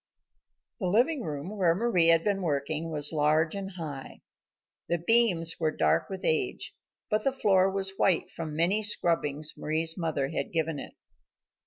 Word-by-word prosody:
The 190 - -2
living 250 - +2
room, 155 +3 -5
where 175 -5 +2
Mari 190 -5 +2
had 165 0 +5
been 200 -2 0
working, 155 0 -2
was 150 -1 +2
large 155 +1 +2
and 195 -1 -5
high. 150 -6 -8 0.7
The 170 - +1
beams 175 -3 +3
were 160 -2 +1
dark 80 - +1
with 190 -1 -6
age, 155 - 0 0.4
but 215 0 +1
the 270 - +2
floor 195 -7 +2
was 195 0 0
white 180 -4 +1
from 165 -2 -6
the - - -6
many 185 +6 +2
scrubbings 155 -7 0
Mari's 160 +2 0
mother 155 -5 -1
had - - -4
given 160 -3 -1
it. - - -9
165 Hz, 165 wpm, -28 LUFS, 155-195 Hz, 0.7 s, had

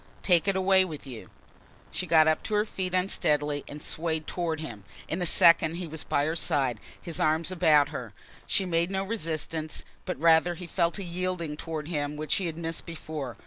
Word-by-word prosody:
"Take 175 -1 +3
it 195 - +2
away 190 0 +4
with 155 -6 -7
you." 125 -5 -9 0.6
She 185 - -3
got 160 -1 +5
up 155 - +2
to 215 - -1
her 210 +1 +2
feet 185 -3 -3
unsteadily 150 -6 +1
and 150 +1 -9
swayed 160 -1 0
toward 165 -3 -2
him. 115 -10 -7 0.2
In 170 +3 -3
a 175 - +2
second 165 0 +5
he 180 +1 -4
was 160 -1 -4
by 145 - +1
her 160 +2 -1
side, 135 -7 +1 0.2
his 170 - -5
arms 155 +3 +2
about 155 -5 +4
her. 125 -7 -6 0.4
She 195 - +2
made 170 0 +1
no 195 0 -1
resistance, 160 -6 -3 0.2
but - - -4
rather 165 +2 +4
he 180 +1 -8
felt 170 +1 0
a 200 - -4
yielding 175 -3 -3
towards 155 -1 -5
him 145 -2 -2
which 155 -1 -1
he 190 - -1
had 165 -1 -4
missed 165 -1 -4
before. 155 -6 -6
165 Hz, 200 wpm, -28 LUFS, 150-180 Hz, 0.6 s, got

